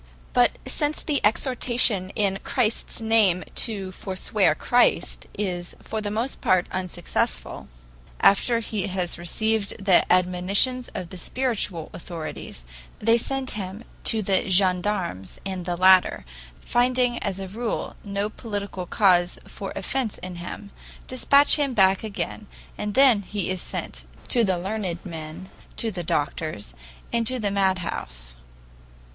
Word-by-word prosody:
But - - +4
since 295 0 -1
the 295 -3 0
exhortation 235 -3 +2
in 195 -3 +1
Christ's 235 -3 -1
name 215 -5 +3
to 200 -5 0
forswear 190 +1 0
Christ 245 0 +2
is 180 -4 -3
for 220 0 -4
the 205 - -3
most 230 +6 -2
part 185 -1 +3
unsuccessful, 175 - -2 0.5
after 230 +4 +4
he 210 -3 -3
has 180 -3 -3
received 215 +4 0
the 190 -3 +4
admonitions 185 +8 +2
of 180 -2 -5
the 185 - -7
spiritual 210 -9 -2
authorities, 165 - -7 0.3
they 225 +2 +3
send 270 +2 0
him 200 +2 -5 0.2
to 220 -2 +4
the 195 0 +1
gendarmes, 185 - +1
and 190 -2 -4
the 175 -1 -1
latter, 185 - +5 0.3
finding, 245 - +1
as 195 -1 -3
a 195 - -5
rule, 225 +4 -3
no 200 0 -2
political 205 -4 -5
cause 180 -3 +3
for 195 - -7
offense 230 +3 -1
in 180 -1 -7
him, 200 +4 -8 0.3
dispatch 280 +4 +5
him 280 -4 0
back 190 -1 +4
again, 215 0 -4 0.3
and 210 -1 -4
then 265 -6 +6
he 200 -1 -3
is 185 -1 -3
sent - - -5 0.2
to 240 - +4
the 190 -4 +2
learned 190 -2 -3
men, 160 +1 -7 0.3
to 225 - 0
the 180 -3 -5
doctors, 150 - -2 0.4
and 230 -1 +1
to 255 - 0
the 210 -4 -1
madhouse. 175 - -2
200 Hz, 135 wpm, -24 LUFS, 180-225 Hz, 0.5 s, then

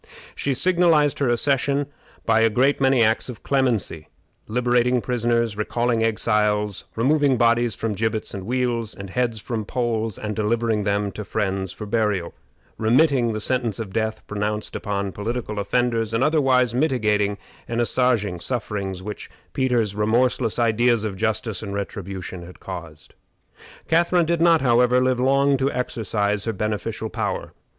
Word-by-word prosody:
She 140 -2 -2
signalized 165 -4 +3
her 140 -3 +1
accession 140 +3 +1 0.4
by 115 -1 +3
a 115 - +5
great 135 +6 +2
many 135 -3 +4
acts 110 +3 +1
of 120 - -9
clemency 120 - 0 0.4
liberating 125 +1 +2
prisoners, 115 -2 0
recalling 115 +2 0
exiles, 105 -2 0
removing 140 +2 +2
bodies 120 0 +2
from 115 -2 -2
gibbets 110 +2 -2
and 95 -2 -5
wheels, 120 -3 -1
and 100 -1 -8
heads 120 -1 -1
from 110 +1 -4
poles, 115 -2 -2
and 105 -1 -4
delivering 110 -1 0
them 100 0 0
to 105 - -6
friends 95 -3 -2
for 105 - -7
burial, 105 -5 0 0.5
remitting 120 +1 +3
the 110 - -3
sentence 120 -2 -1
of 105 -4 -6
death 110 0 -2
pronounced 105 +1 -3
upon 100 -1 -2
political 105 +1 -4
offenders, 115 0 0
and 115 - +2
otherwise 135 -6 +3
mitigating 105 -7 +1 0.3
and 115 0 -2
assuaging 115 -6 +1
sufferings 100 -3 -3
which 105 +1 -7 0.2
Peter's 120 -6 +1
remorseless 115 +2 +1
ideas 120 -1 +2
of 105 -3 -3
justice 110 0 -1
and 100 -2 -5
retribution 95 -2 -5
had 85 +1 -12
caused. 85 -5 -9 0.7
Catharine 170 +1 +3
did 170 0 0
not, 165 -1 +5
however, 125 0 +4
live 130 -1 +1
long 140 +2 +3
to 135 +1 0
exercise 105 -4 -1
her 115 - -1
beneficial 105 +1 -3
power. - - -3
115 Hz, 145 wpm, -23 LUFS, 105-125 Hz, 0.7 s, a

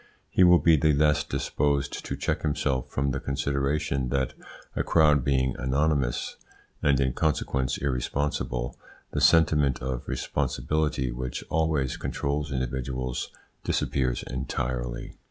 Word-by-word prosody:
He 95 - +5
will 90 0 +8
be 85 -2 +5
the 75 +2 +3
less 75 0 +3
disposed 70 -2 -1
to - - -3
check - - -1
himself 70 -4 -1
from 70 0 0
the 65 - -2
consideration 70 -1 -1
that, 65 0 0 0.4
a - - +1
crowd 75 -4 +4
being 65 -1 +1
anonymous, 70 -1 0 0.4
and 70 -2 +3
in 65 -2 +1
consequence 65 -4 0
irresponsible, 65 -2 -2 0.4
the - - -1
sentiment 75 -5 +4
of 65 -1 -3
responsibility 75 -5 -1
which 60 0 -4
always 80 -5 +1
controls 70 +1 -2
individuals 65 -1 -3 0.3
disappears 65 -3 0
entirely. 60 -2 -3
70 Hz, 120 wpm, -27 LUFS, 65-75 Hz, 0.4 s, will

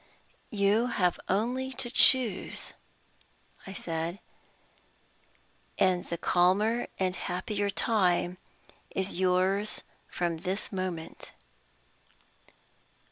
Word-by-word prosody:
"You 210 +3 +2
have 180 -7 +1
only 245 +7 0
to 240 -2 -5
choose," 255 -7 +3 0.9
I 195 - -6
said, 165 +1 -3 1.6
"and 185 -2 +2
the 170 - -4
calmer 200 +8 +2
and 185 -1 0
happier 200 +4 -2
time 185 -3 +1 0.5
is 190 -1 -1
yours 190 +3 +1 0.3
from 170 -2 -1
this 185 +4 -1
moment." 185 -4 -5
190 Hz, 80 wpm, -29 LUFS, 180-210 Hz, 1.6 s, choose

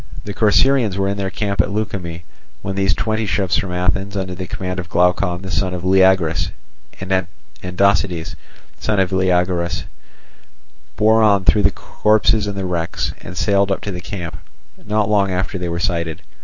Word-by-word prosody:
The 100 - -5
Corcyraeans 110 0 +3
were 95 0 +1
in 100 +1 -1
their 95 -1 -2
camp 100 0 0
at - - -2
Leukimme, 95 -5 -4 0.4
when 95 - -3
these 95 0 +1
twenty 110 +1 -1
ships 95 -2 +1
from 95 - -2
Athens, 95 +3 -1
under 95 -1 -3
the 90 0 -6
command 90 +1 -4
of 90 -1 -6
Glaucon, 90 +1 +1
the 95 - -5
son 90 0 0
of 90 - -6
Leagrus, 95 -3 +3 0.5
and 95 -1 0 0.3
Andocides, 90 -2 0 0.4
son 105 -2 0
of 95 -1 +1
Leogoras, 90 -2 +1 1.1
bore 110 +1 +4
on 100 -3 +4
through 105 - +4
the 90 - +4
corpses 110 0 +1
and 100 - -3
the 95 - -2
wrecks, 85 -2 -2
and 90 - -9
sailed 100 +1 +2
up 95 - -1
to 100 - -4
the 90 -1 -6
camp, 85 -7 -6 0.5
not 105 -1 0
long 100 -2 +2
after 95 +1 -2
they 90 -1 -3
were 85 0 -2
sighted. 85 -4 -2
95 Hz, 175 wpm, -19 LUFS, 90-100 Hz, 1.1 s, bore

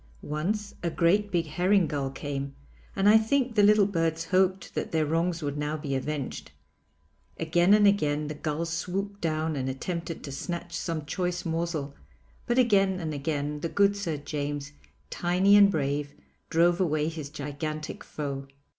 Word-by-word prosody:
Once 200 +8 -2
a 170 - 0
great 195 +6 +2
big 170 -2 +1
herring 185 +4 +2
gull 140 -3 -2
came 140 0 -5 0.4
and 195 - +2
I 215 +1 +8
think 250 +2 +1
the 210 - +4
little 205 0 +6
birds 165 -4 0
hoped 190 0 +1
that - - -3
their 160 -1 +2
wrongs 165 +2 0
would 145 0 -2
now 150 +1 -1
be 145 -2 -4
avenged. 135 +1 -3 0.9
Again 175 +4 +4
and 210 -1 +5
again 150 -7 +2
the 150 - -4
gull 155 +2 -2
swooped 195 +4 -3
down 155 -1 -1
and 130 -1 -2
attempted 165 +5 -4
to 140 - -6
snatch 170 +4 -5
some 160 -4 -3
choice 180 +2 -2
morsel, 165 -4 -2 0.5
but 240 - +1
again 195 -6 +3
and 160 -3 -3
again 145 0 -2
the 165 - -3
good 200 +2 +3
Sir 170 -7 -2
James 145 0 -4 0.4
tiny 185 +3 +3
and 200 -1 +8
brave, 145 -3 -1 0.3
drove 170 +2 +3
away 155 -3 +1
his 160 -3 -5
gigantic 150 +1 -5
foe. 140 -2 -5
165 Hz, 165 wpm, -28 LUFS, 150-190 Hz, 0.9 s, I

